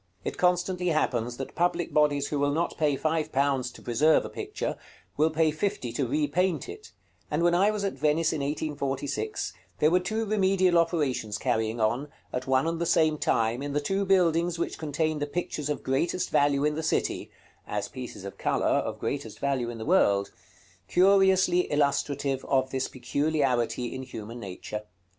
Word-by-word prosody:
It -, -, -3 dB
constantly 180 Hz, 0 st, +1 dB
happens, 120 Hz, -7 st, 0 dB
that 135 Hz, -, -6 dB
public 175 Hz, 0 st, 0 dB
bodies 145 Hz, -2 st, +2 dB
who 145 Hz, -, -1 dB
will 145 Hz, 0 st, +2 dB
not 165 Hz, +4 st, -1 dB
pay 150 Hz, -3 st, +1 dB
five 155 Hz, +1 st, -1 dB
pounds 135 Hz, -2 st, +1 dB
to -, -, -14 dB
preserve 145 Hz, +7 st, +3 dB
a -, -, -5 dB
picture, -, -, -4 dB, 0.4 s
will 155 Hz, +2 st, +3 dB
pay 160 Hz, 0 st, +2 dB
fifty 155 Hz, -, -2 dB
to 130 Hz, +1 st, -1 dB
repaint 155 Hz, +6 st, 0 dB
it: 425 Hz, +2 st, -10 dB, 0.4 s
and 150 Hz, +3 st, 0 dB
when 175 Hz, 0 st, +4 dB
I 190 Hz, +4 st, +4 dB
was 210 Hz, -1 st, -2 dB
at 195 Hz, -, -1 dB
Venice 150 Hz, +4 st, +1 dB
in 155 Hz, -, -2 dB
1846, 145 Hz, -, -3 dB, 0.2 s
there 155 Hz, -, +3 dB
were 180 Hz, -, +5 dB
two 215 Hz, +5 st, -2 dB
remedial 190 Hz, -4 st, +3 dB
operations 135 Hz, -, 0 dB
carrying 110 Hz, -1 st, -1 dB
on, 120 Hz, +6 st, +1 dB, 0.3 s
at 125 Hz, +1 st, -3 dB
one 130 Hz, +2 st, +3 dB
and 165 Hz, 0 st, -2 dB
the 170 Hz, -, 0 dB
same 155 Hz, -2 st, +3 dB
time, 115 Hz, +2 st, +1 dB
in 145 Hz, 0 st, -4 dB
the 145 Hz, -, +2 dB
two 195 Hz, +7 st, -1 dB
buildings 175 Hz, -3 st, +2 dB
which 170 Hz, -, -3 dB
contain 155 Hz, 0 st, -1 dB
the 145 Hz, -, -2 dB
pictures 150 Hz, -2 st, -3 dB
of 150 Hz, -, -2 dB
greatest 140 Hz, +7 st, 0 dB
value 145 Hz, 0 st, +3 dB
in 150 Hz, -, +2 dB
the 155 Hz, -, -3 dB
city 160 Hz, -, -1 dB, 0.4 s
(as -, -, -2 dB
pieces -, -, -8 dB
of -, -, -8 dB
color, -, -, 0 dB
of -, -, +1 dB
greatest -, -, -4 dB
value 135 Hz, -4 st, -1 dB
in 120 Hz, -, -6 dB
the 110 Hz, -, -6 dB
world), 100 Hz, -, +3 dB, 0.6 s
curiously 190 Hz, -1 st, +4 dB
illustrative 140 Hz, -1 st, 0 dB
of 130 Hz, -1 st, +1 dB
this 130 Hz, 0 st, -1 dB
peculiarity 130 Hz, -2 st, 0 dB
in 130 Hz, -, -5 dB
human 115 Hz, -2 st, -8 dB
nature. 100 Hz, +1 st, -6 dB
150 Hz, 180 wpm, -27 LUFS, 130-175 Hz, 0.6 s, were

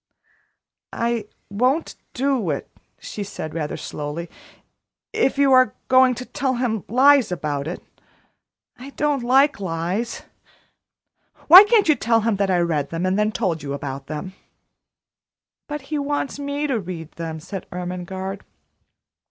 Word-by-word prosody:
"I 235 Hz, -2 st, -1 dB, 0.2 s
won't 255 Hz, +10 st, 0 dB, 0.2 s
do 260 Hz, -7 st, 0 dB
it," 140 Hz, -, -3 dB, 0.3 s
she 210 Hz, -, -6 dB
said 155 Hz, -5 st, -7 dB
rather 155 Hz, -2 st, -3 dB
slowly, 150 Hz, +4 st, -6 dB, 0.8 s
"if 435 Hz, -12 st, +1 dB
you 280 Hz, -1 st, +4 dB
are 255 Hz, 0 st, +5 dB
going 255 Hz, -1 st, +5 dB
to 250 Hz, -, -7 dB
tell 270 Hz, -2 st, -2 dB
him 235 Hz, -5 st, -1 dB
lies 265 Hz, -1 st, +5 dB
about 150 Hz, -3 st, -3 dB
it 175 Hz, -, -6 dB, 1.0 s
I 265 Hz, +3 st, -9 dB
don't 290 Hz, -2 st, +1 dB
like 265 Hz, +2 st, +3 dB
lies. 185 Hz, +5 st, -3 dB, 1.2 s
Why 370 Hz, +6 st, +11 dB
can't 425 Hz, -3 st, +3 dB
you 310 Hz, -, +6 dB
tell 230 Hz, -4 st, +1 dB
him 225 Hz, -1 st, +1 dB
I 190 Hz, -2 st, +2 dB
read 155 Hz, -5 st, 0 dB
them 165 Hz, +2 st, -3 dB
and 185 Hz, +2 st, +1 dB
then 210 Hz, 0 st, +2 dB
told 185 Hz, -8 st, -1 dB
you 140 Hz, -1 st, -5 dB
about 140 Hz, -1 st, -6 dB
them?" 155 Hz, +5 st, -6 dB, 1.3 s
"But 295 Hz, 0 st, -5 dB
he 300 Hz, -, +1 dB
wants 285 Hz, 0 st, -2 dB
me 285 Hz, +1 st, -2 dB
to 265 Hz, -6 st, 0 dB
read 170 Hz, -4 st, -7 dB
them," 165 Hz, -1 st, -6 dB
said 180 Hz, +3 st, -7 dB
Ermengarde. 180 Hz, +2 st, -5 dB
210 Hz, 140 wpm, -22 LUFS, 170-270 Hz, 1.3 s, Why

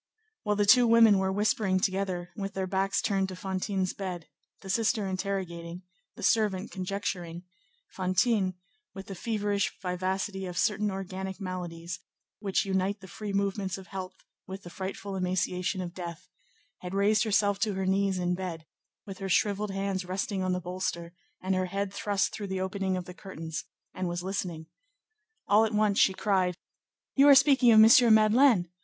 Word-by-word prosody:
While 210 Hz, -1 st, 0 dB
the 205 Hz, 0 st, +2 dB
two 245 Hz, +3 st, +6 dB
women 225 Hz, -3 st, +6 dB
were 190 Hz, 0 st, 0 dB
whispering 200 Hz, -1 st, +1 dB
together, 185 Hz, -2 st, -2 dB
with 195 Hz, -2 st, -5 dB
their 190 Hz, -1 st, -1 dB
backs 195 Hz, +1 st, 0 dB
turned 195 Hz, -1 st, 0 dB
to 185 Hz, -, -6 dB
Fantine's 190 Hz, 0 st, -2 dB
bed, 180 Hz, -4 st, -5 dB, 0.4 s
the 190 Hz, -, -10 dB
sister 220 Hz, +1 st, +1 dB
interrogating, 185 Hz, -2 st, -4 dB, 0.3 s
the -, -, -9 dB
servant 210 Hz, -4 st, +1 dB
conjecturing, 180 Hz, -3 st, -4 dB, 0.5 s
Fantine, 185 Hz, +1 st, +1 dB, 0.4 s
with 195 Hz, 0 st, -7 dB
the 195 Hz, -, -7 dB
feverish 205 Hz, 0 st, -1 dB
vivacity 190 Hz, +1 st, -2 dB
of 180 Hz, 0 st, -7 dB
certain 210 Hz, -2 st, +1 dB
organic 190 Hz, 0 st, -5 dB
maladies, 175 Hz, -2 st, -5 dB, 0.4 s
which 200 Hz, -2 st, 0 dB
unite 190 Hz, +1 st, 0 dB
the 190 Hz, -, -11 dB
free 205 Hz, +3 st, -6 dB
movements 195 Hz, -1 st, -1 dB
of 190 Hz, -1 st, -12 dB
health 190 Hz, -1 st, -6 dB, 0.3 s
with 190 Hz, 0 st, -7 dB
the 175 Hz, -, -10 dB
frightful 195 Hz, +1 st, -5 dB
emaciation 185 Hz, 0 st, -1 dB
of 175 Hz, -1 st, -6 dB
death, 170 Hz, -3 st, -7 dB, 0.5 s
had 180 Hz, +1 st, -6 dB
raised 210 Hz, +2 st, +3 dB
herself 205 Hz, -2 st, +2 dB
to 215 Hz, -3 st, 0 dB
her 190 Hz, 0 st, -2 dB
knees 195 Hz, 0 st, +1 dB
in 180 Hz, 0 st, 0 dB
bed, 175 Hz, -3 st, -5 dB, 0.4 s
with 195 Hz, -2 st, -8 dB
her 195 Hz, -1 st, -4 dB
shrivelled 205 Hz, +2 st, +1 dB
hands 195 Hz, -1 st, -2 dB
resting 190 Hz, +2 st, -3 dB
on 185 Hz, 0 st, 0 dB
the 180 Hz, -, 0 dB
bolster, 175 Hz, -1 st, -4 dB, 0.3 s
and 190 Hz, +1 st, 0 dB
her 185 Hz, 0 st, 0 dB
head 195 Hz, +1 st, -3 dB
thrust 200 Hz, 0 st, 0 dB
through 205 Hz, -2 st, -5 dB
the 190 Hz, -1 st, -3 dB
opening 190 Hz, 0 st, -1 dB
of 180 Hz, -, -5 dB
the 180 Hz, -, -9 dB
curtains, 165 Hz, -5 st, -7 dB, 0.3 s
and 185 Hz, -1 st, -3 dB
was 175 Hz, 0 st, -3 dB
listening. 180 Hz, -4 st, -4 dB, 0.8 s
All 210 Hz, +2 st, +5 dB
at 220 Hz, -1 st, -1 dB
once 210 Hz, -1 st, +2 dB
she 190 Hz, -, +4 dB
cried:— 185 Hz, -4 st, +1 dB, 0.6 s
"You 280 Hz, +1 st, +6 dB
are 285 Hz, -, +9 dB
speaking 270 Hz, -3 st, +6 dB
of 220 Hz, -1 st, +8 dB, 0.2 s
M. 235 Hz, -2 st, +5 dB
Madeleine! 215 Hz, -2 st, +4 dB
190 Hz, 170 wpm, -28 LUFS, 185-205 Hz, 0.8 s, are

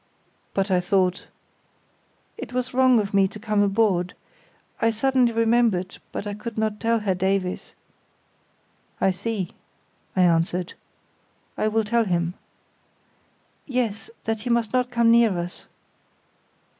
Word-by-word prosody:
"But 195 Hz, 0 st, 0 dB
I 180 Hz, -, +4 dB
thought——" 185 Hz, 0 st, 0 dB, 1.1 s
"It 255 Hz, -, -8 dB
was 255 Hz, 0 st, -2 dB
wrong 255 Hz, -1 st, +5 dB
of 205 Hz, -1 st, -3 dB
me 195 Hz, -1 st, +4 dB
to 210 Hz, -, -10 dB
come 210 Hz, -1 st, 0 dB
aboard—I 200 Hz, +2 st, -1 dB
suddenly 250 Hz, +2 st, +2 dB
remembered; 225 Hz, -5 st, +1 dB
but -, -, -5 dB
I 205 Hz, -, -3 dB
could 220 Hz, +2 st, -7 dB
not 215 Hz, -1 st, -1 dB
tell 230 Hz, 0 st, +2 dB
Herr 200 Hz, -2 st, +1 dB
Davies." 190 Hz, 0 st, -2 dB, 1.2 s
"I 190 Hz, -, +3 dB
see," 195 Hz, -1 st, -3 dB, 0.6 s
I 185 Hz, -, +4 dB
answered. 175 Hz, +1 st, +1 dB, 0.8 s
"I -, -, 0 dB
will 220 Hz, +1 st, +1 dB
tell 230 Hz, +2 st, +1 dB
him." 170 Hz, -2 st, 0 dB, 1.3 s
"Yes, 245 Hz, -, -2 dB
that 225 Hz, -1 st, -2 dB
he 245 Hz, -, -4 dB
must 235 Hz, -2 st, +1 dB
not 250 Hz, -1 st, +1 dB
come 235 Hz, -2 st, +3 dB
near 230 Hz, -5 st, +4 dB
us." 175 Hz, +1 st, -6 dB
210 Hz, 130 wpm, -24 LUFS, 190-235 Hz, 1.3 s, wrong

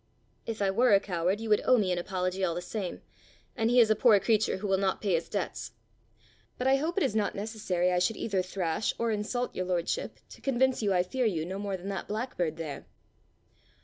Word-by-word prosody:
"If 220 Hz, -3 st, -2 dB
I 195 Hz, -, +2 dB
were 235 Hz, +1 st, +5 dB
a -, -, +5 dB
coward, 185 Hz, +1 st, -1 dB
you 225 Hz, 0 st, -5 dB
would 210 Hz, -, +4 dB
owe 255 Hz, -, +5 dB
me 195 Hz, -5 st, +1 dB
an 180 Hz, -, 0 dB
apology 185 Hz, +1 st, -2 dB
all 170 Hz, -3 st, +1 dB
the -, -, -2 dB
same, 190 Hz, -1 st, -5 dB, 0.5 s
and 225 Hz, -2 st, +1 dB
he 245 Hz, +1 st, +5 dB
is 225 Hz, -2 st, +6 dB
a -, -, +4 dB
poor 215 Hz, -2 st, +5 dB
creature 215 Hz, -1 st, +1 dB
who 200 Hz, -, -6 dB
will 190 Hz, -1 st, +2 dB
not 195 Hz, -1 st, 0 dB
pay 200 Hz, -4 st, 0 dB
his 165 Hz, 0 st, 0 dB
debts. -, -, -4 dB, 0.8 s
But 250 Hz, -, -3 dB
I 265 Hz, +1 st, +5 dB
hope 320 Hz, +6 st, -2 dB
it 390 Hz, -, +3 dB
is 240 Hz, -6 st, 0 dB
not 210 Hz, -2 st, 0 dB
necessary 195 Hz, -4 st, -1 dB
I 180 Hz, -, +2 dB
should 215 Hz, +5 st, +1 dB
either 195 Hz, -4 st, 0 dB
thrash 185 Hz, 0 st, -2 dB
or 230 Hz, -1 st, 0 dB
insult 220 Hz, +4 st, -2 dB
your 185 Hz, -, -2 dB
lordship 180 Hz, -, -2 dB
to -, -, -13 dB
convince 260 Hz, -1 st, +1 dB
you 205 Hz, -2 st, +1 dB
I 180 Hz, -1 st, +3 dB
fear 245 Hz, +6 st, 0 dB
you 165 Hz, -6 st, -1 dB
no 190 Hz, +3 st, -5 dB
more 200 Hz, -2 st, -3 dB
than 185 Hz, +2 st, -7 dB
that 195 Hz, -, -4 dB
blackbird 205 Hz, -8 st, -2 dB
there!" 155 Hz, -4 st, -6 dB
200 Hz, 230 wpm, -29 LUFS, 180-225 Hz, 0.8 s, is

